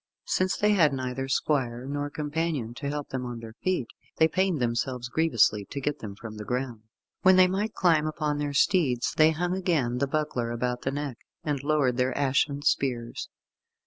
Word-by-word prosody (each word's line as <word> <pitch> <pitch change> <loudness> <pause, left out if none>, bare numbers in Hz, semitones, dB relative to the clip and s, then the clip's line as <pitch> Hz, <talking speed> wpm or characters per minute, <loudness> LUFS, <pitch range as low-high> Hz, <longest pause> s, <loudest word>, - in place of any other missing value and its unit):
Since 185 0 +1
they 210 0 +3
had 165 -8 +4
neither 130 0 -3
squire 130 -3 0
nor 145 +1 -3
companion 150 -5 -2
to 140 +3 -4
help 145 0 -4
them 130 -1 -3
on 120 -1 -5
their 115 -1 -9
feet, 185 -9 +1 0.3
they 160 - +5
pained 185 -1 +1
them 120 -2 +1 0.4
grievously 115 -10 +3
to 140 - -6
get 145 +1 -2
them 100 -3 -7
from 110 0 -9
the 105 - -6
ground. 125 -1 -3 0.4
When 185 0 +6
they 185 0 +7
might 205 +4 -2
climb 160 -4 +3
upon 150 -1 -1
their 145 -1 -1
steeds, 140 -6 +2
they 155 0 +6
hung 175 +3 -1
again 150 -10 0
the 140 - +1
buckler 140 -5 -1
about 125 +1 -2
the 135 - -1
neck, 140 -3 -4 0.2
and 145 -3 -1
lowered 140 -5 +2
their 130 0 +1
ashen 140 +1 +1
spears. 120 -5 -1
140 Hz, 185 wpm, -27 LUFS, 125-160 Hz, 0.4 s, they